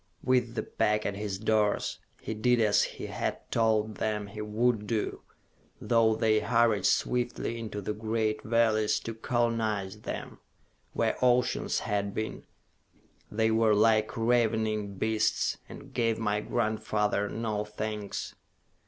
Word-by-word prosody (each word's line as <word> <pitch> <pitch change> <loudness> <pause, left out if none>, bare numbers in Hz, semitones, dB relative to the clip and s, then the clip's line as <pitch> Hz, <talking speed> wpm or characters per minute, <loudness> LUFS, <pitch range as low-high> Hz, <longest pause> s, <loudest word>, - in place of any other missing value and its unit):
With 125 -2 +1
the - - -1
pack 105 0 0
at 100 - -1
his 100 -2 -3
doors, 105 0 +1 0.2
he - - -4
did 120 +3 +2
as 105 -2 +4
he - - -3
had - - -2
told 110 -2 +1
them 105 -1 -1
he 100 +1 -8
would 105 0 0
do. 110 0 -2 0.6
Though 115 -2 +3
they 110 -1 +3
hurried 115 -3 +2
swiftly 120 -1 0
into 110 -2 -5
the 105 +2 -3
great 110 0 -1
valleys 110 -2 +2
to 115 - -5
colonize 110 -4 -1
them - - -6 0.5
where - - 0
oceans 125 0 +2
had 100 -1 -2
been 110 0 -4 0.8
they 110 +1 +1
were 110 -1 +4
like 110 +2 +3
ravening 110 -3 +1
beasts, 110 +2 0
and - - -11
gave 115 -1 +1
my 105 -2 0
grandfather 105 -2 0
no 110 -2 -2
thanks. 105 -1 -5
110 Hz, 135 wpm, -29 LUFS, 105-115 Hz, 0.8 s, as